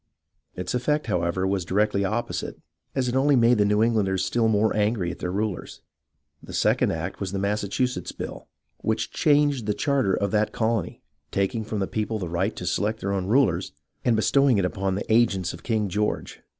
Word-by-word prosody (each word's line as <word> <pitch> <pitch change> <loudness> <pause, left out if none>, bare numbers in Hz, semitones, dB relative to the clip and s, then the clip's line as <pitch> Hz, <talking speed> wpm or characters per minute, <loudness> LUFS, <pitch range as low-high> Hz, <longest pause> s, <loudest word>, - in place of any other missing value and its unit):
Its 90 -1 -4
effect, 150 +5 0
however, 90 +1 0
was 95 -1 0
directly 100 +2 +1
opposite, 110 +5 -3 0.4
as 130 -2 +1
it 120 - -1
only 140 +2 +4
made 120 -2 +4
the 105 - +4
New 105 +1 +3
Englanders 105 -5 +1
still 115 -2 +1
more 110 0 +2
angry 105 -4 +1
at - - -9
their 90 - -3
rulers. 100 -1 -3 0.6
The - - -11
second - - +2
act - - -4
was 95 -2 -3
the 100 - -2
Massachusetts 105 +5 -1
Bill, - - -7 0.3
which - - -1
changed 145 -6 +2
the 105 - +1
charter 135 -10 +1
of 100 -1 -1
that 105 0 +1
colony, 115 -1 -1 0.3
taking 100 +3 -1
from 110 0 -4
the 95 -1 -1
peo 105 -1 -2
ple 110 - -2
the 90 -5 -4
right 95 +5 -1
to 90 - -6
select 105 +5 0
their 100 0 -1
own 95 -2 -1
rulers, 100 -7 +2 0.3
and 120 -2 +3
bestowing 135 +2 +3
it 95 - +2
upon 95 +1 -1
the 100 - -3
agents 100 -7 +2
of - - -10
King 110 -3 0
George. 105 +3 -2
105 Hz, 195 wpm, -25 LUFS, 95-115 Hz, 0.6 s, only